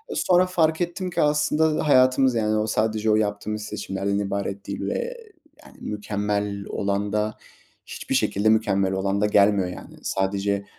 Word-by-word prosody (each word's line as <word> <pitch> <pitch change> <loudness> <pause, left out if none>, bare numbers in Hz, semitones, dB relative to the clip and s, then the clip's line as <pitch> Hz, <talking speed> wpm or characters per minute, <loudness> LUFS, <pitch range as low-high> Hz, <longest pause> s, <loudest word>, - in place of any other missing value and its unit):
Sonra 180 0 +3
fark 165 -3 +1
ettim 175 +2 -2
ki 175 - -1
aslında 150 +1 +2
hayatımız, 130 -1 +4
yani, 110 -1 +1
o 105 0 0
sadece 110 0 0
o - - +4
yaptığımız 105 0 -2
seçimlerden 100 -1 -3
ibaret 100 0 -3
değil - - -4
ve - - -3 0.5
yani, - - -16
mükemmel 105 -1 -3
olan 100 +1 -2
da 105 0 -1 0.5
hiçbir - - -4
şekilde 100 +2 +1
mükemmel 100 -3 +2
olan 95 +1 -1
da - - +3
gelmiyor, 100 -2 +3
yani. 90 - -10
Sadece 100 +1 -1
105 Hz, 150 wpm, -24 LUFS, 100-130 Hz, 0.5 s, hayatımız